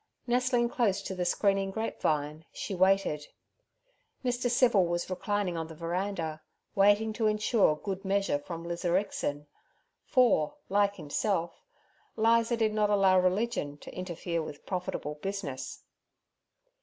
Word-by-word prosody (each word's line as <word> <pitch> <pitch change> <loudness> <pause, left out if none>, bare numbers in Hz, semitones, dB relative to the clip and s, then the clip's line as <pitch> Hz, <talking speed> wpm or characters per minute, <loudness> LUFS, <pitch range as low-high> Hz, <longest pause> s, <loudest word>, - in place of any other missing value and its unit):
Nestling 245 0 +2
close 235 -6 0
to - - -4
the 180 -1 -2
screening 195 +2 +2
grape 220 +3 -4
vine, 150 +1 0
she - - -5
waited. 185 -5 +2 1.0
Mr. 245 0 0
Civil 240 -7 +4
was 175 +2 -2
reclining 200 -1 -1
on 165 -1 -3
the 160 - -10
veranda, 170 -1 -3 0.3
waiting 205 +2 +4
to 220 0 +1
insure 210 -5 +3
good 195 +4 -5
measure 195 -6 +1
from 165 +3 -7
Lizarixin; 170 -4 -1 0.6
for, 235 - +3
like 200 +1 +2
himself, 170 +2 -2 0.5
Liza 230 +1 +3
did 220 -2 +1
not 210 -1 +2
allow 195 -2 +5
religion 185 -5 0
to - - -11
interfere 175 -2 -3
with 150 -2 -8
profitable 165 -5 -4
business. 195 -10 -5
195 Hz, 130 wpm, -30 LUFS, 170-215 Hz, 1.0 s, allow